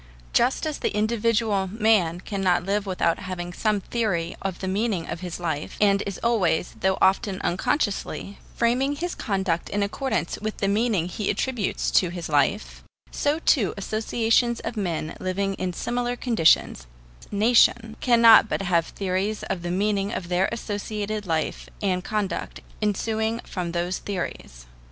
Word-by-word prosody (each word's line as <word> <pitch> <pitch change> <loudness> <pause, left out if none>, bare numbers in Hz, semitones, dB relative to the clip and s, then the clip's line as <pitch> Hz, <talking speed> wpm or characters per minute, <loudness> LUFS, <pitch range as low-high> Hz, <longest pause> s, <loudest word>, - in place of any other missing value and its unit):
Just 250 +6 +2
as 310 -2 -3
the - - -1
individual 220 -2 +1
man 205 -6 +2
cannot 185 -4 0
live 200 +1 -1
without 180 -3 +1
having 175 -2 -5
some 210 +1 0
theory 190 -7 -1
of 190 -3 -3
the 190 - -5
meaning 195 -3 -1
of 170 - -4
his 180 -1 -6
life, 160 -4 -3
and 200 -1 +4
is 195 - -4
always, 200 -8 +1
though 190 0 +1
often 195 0 +2
unconsciously, 200 - -1 0.2
framing 255 +5 +1
his 350 +4 -3
conduct 190 -5 -1
in 205 0 0
accordance 260 +6 -2
with 215 0 -3
the 195 - 0
meaning 205 -4 +1
he 200 +3 -3
attributes 245 -7 -1
to 180 - +3
his 175 -2 -6
life, 150 +8 0 0.3
so 290 +1 0
too 260 - +2
associations 225 +3 +1
of 225 +1 -4
men 170 -7 -2
living 195 +1 -1
in 185 -1 -1
similar 245 +6 -2
conditions 190 - +2 0.4
nations 225 +1 +3
cannot 230 -3 +7
but - - -1
have 170 -3 +2
theories 195 +2 -2
of 190 -3 -2
the 175 - -4
meaning 200 +2 0
of 175 - -4
their 180 +1 +2
associated 210 -2 -4
life 160 -2 -2
and 185 -3 0
conduct 210 -2 -3 0.2
ensuing 220 +2 0
from 175 -2 -4
those 175 +2 -2
theories. 175 - -5
200 Hz, 150 wpm, -25 LUFS, 180-225 Hz, 0.4 s, cannot